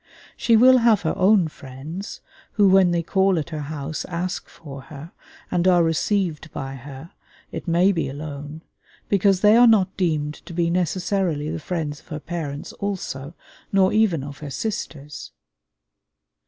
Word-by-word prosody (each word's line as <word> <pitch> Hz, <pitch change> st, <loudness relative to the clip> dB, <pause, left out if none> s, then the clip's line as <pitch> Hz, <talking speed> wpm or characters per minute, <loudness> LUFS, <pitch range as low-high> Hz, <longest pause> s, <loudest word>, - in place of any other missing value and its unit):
She 230 Hz, -1 st, +3 dB
will 255 Hz, +2 st, +7 dB
have 230 Hz, -5 st, +3 dB
her 160 Hz, -, 0 dB
own 190 Hz, -2 st, +4 dB
friends, 150 Hz, +7 st, -8 dB, 0.3 s
who 205 Hz, -2 st, +4 dB
when 190 Hz, -1 st, +5 dB
they 170 Hz, -1 st, 0 dB
call 190 Hz, +2 st, +2 dB
at 160 Hz, +2 st, -3 dB
her 155 Hz, -, -4 dB
house 150 Hz, +1 st, -5 dB
ask 180 Hz, +1 st, -4 dB
for 140 Hz, -4 st, -10 dB
her, 155 Hz, +2 st, -10 dB, 0.4 s
and 175 Hz, +1 st, +1 dB
are 175 Hz, -2 st, +5 dB
received 165 Hz, -1 st, -1 dB
by 135 Hz, 0 st, -5 dB
her, 135 Hz, +4 st, -10 dB, 0.4 s
it -, -, -7 dB
may 175 Hz, +3 st, +4 dB
be 165 Hz, -7 st, -1 dB
alone; 145 Hz, +2 st, -7 dB, 0.5 s
because 195 Hz, -1 st, +3 dB
they 210 Hz, +1 st, +6 dB
are 240 Hz, +1 st, +7 dB
not 195 Hz, -4 st, +3 dB
deemed 155 Hz, -5 st, 0 dB
to -, -, -8 dB
be 170 Hz, 0 st, 0 dB
necessarily 175 Hz, -3 st, -1 dB
the 165 Hz, -, -4 dB
friends 155 Hz, -3 st, -4 dB
of -, -, -25 dB
her 155 Hz, -3 st, -5 dB
parents 155 Hz, -3 st, -5 dB
also, 170 Hz, -7 st, -5 dB, 0.4 s
nor 190 Hz, -1 st, +3 dB
even 205 Hz, -10 st, +2 dB
of 140 Hz, 0 st, -8 dB
her 150 Hz, -, -7 dB
sisters. 150 Hz, -, -5 dB
170 Hz, 160 wpm, -23 LUFS, 150-190 Hz, 0.5 s, will